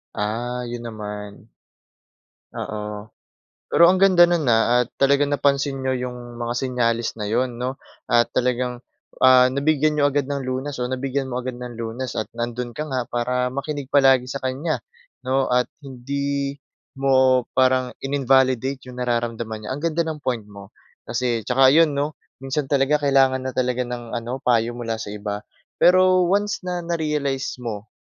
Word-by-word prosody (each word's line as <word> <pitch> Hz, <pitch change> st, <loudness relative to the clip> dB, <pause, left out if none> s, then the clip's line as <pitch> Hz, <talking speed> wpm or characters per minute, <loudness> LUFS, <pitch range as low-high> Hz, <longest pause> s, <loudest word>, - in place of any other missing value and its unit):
Ah, 120 Hz, +4 st, -2 dB
yun 120 Hz, 0 st, -5 dB
naman. 105 Hz, 0 st, -8 dB, 1.0 s
Oo. 105 Hz, 0 st, -6 dB, 0.6 s
Pero 170 Hz, -, +7 dB
ang 185 Hz, -, +4 dB
ganda 185 Hz, -3 st, +6 dB
no'n 170 Hz, -3 st, +1 dB
ah 120 Hz, +2 st, +3 dB
at -, -, -21 dB
talaga 140 Hz, +1 st, +4 dB
napansin 140 Hz, -1 st, +1 dB
niyo 130 Hz, 0 st, 0 dB
'yong 120 Hz, -1 st, -9 dB
mga 120 Hz, 0 st, -3 dB
senyales 120 Hz, -3 st, 0 dB
na 105 Hz, -, -3 dB
'yon 120 Hz, +3 st, 0 dB
'no. 130 Hz, +2 st, -4 dB, 0.3 s
At 120 Hz, 0 st, +3 dB
talagang, 125 Hz, 0 st, 0 dB, 0.4 s
ah, 130 Hz, -1 st, +7 dB
nabigyan 150 Hz, +2 st, +1 dB
niyo 145 Hz, -, +3 dB
agad 140 Hz, -1 st, 0 dB
ng 140 Hz, -2 st, -3 dB
lunas 130 Hz, +3 st, -3 dB
o 125 Hz, -, -1 dB
nabigyan 135 Hz, +2 st, -2 dB
mo 125 Hz, -1 st, -3 dB
agad 125 Hz, 0 st, -5 dB
ng 125 Hz, -1 st, -7 dB
lunas 115 Hz, +2 st, -5 dB
at 110 Hz, -, -5 dB
nandoon 120 Hz, +1 st, -3 dB
ka 150 Hz, -, -2 dB
nga 130 Hz, -3 st, -1 dB
para 125 Hz, +1 st, 0 dB
makinig 140 Hz, +1 st, -4 dB
palagi 135 Hz, -3 st, +4 dB
sa 140 Hz, -, -3 dB
kanya, 140 Hz, +5 st, -1 dB, 0.5 s
'no 130 Hz, +1 st, +1 dB
at 125 Hz, 0 st, +3 dB, 0.2 s
hindi 140 Hz, +1 st, -3 dB, 0.4 s
mo 130 Hz, -2 st, +4 dB
parang 130 Hz, -1 st, +3 dB
inin-validate 135 Hz, -1 st, +2 dB
'yong 125 Hz, 0 st, -8 dB
nararamdaman 115 Hz, -2 st, -2 dB
niya. -, -, -5 dB
Ang 140 Hz, -, -6 dB
ganda 165 Hz, 0 st, +1 dB
ng 155 Hz, -2 st, -4 dB
point 120 Hz, -5 st, -2 dB
mo 100 Hz, -1 st, -12 dB, 0.4 s
kasi 120 Hz, -2 st, -1 dB
tsaka 130 Hz, +1 st, +5 dB
ayon 160 Hz, +1 st, +5 dB
'no, 145 Hz, +2 st, -1 dB, 0.3 s
minsan 135 Hz, +1 st, -2 dB
talaga 140 Hz, +1 st, +2 dB
kailangan 135 Hz, -2 st, +3 dB
na 130 Hz, -, -3 dB
talaga 125 Hz, 0 st, 0 dB
ng 120 Hz, -1 st, -6 dB
ano, 120 Hz, +2 st, -3 dB
payo 120 Hz, -1 st, +2 dB
mula 115 Hz, -1 st, -2 dB
sa -, -, -6 dB
iba. 105 Hz, 0 st, -4 dB, 0.4 s
Pero 185 Hz, +1 st, +5 dB
once 205 Hz, +2 st, +1 dB
na 180 Hz, -1 st, -3 dB
narealize 150 Hz, -5 st, -1 dB
mo 110 Hz, -3 st, -6 dB
130 Hz, 165 wpm, -22 LUFS, 120-140 Hz, 1.0 s, Pero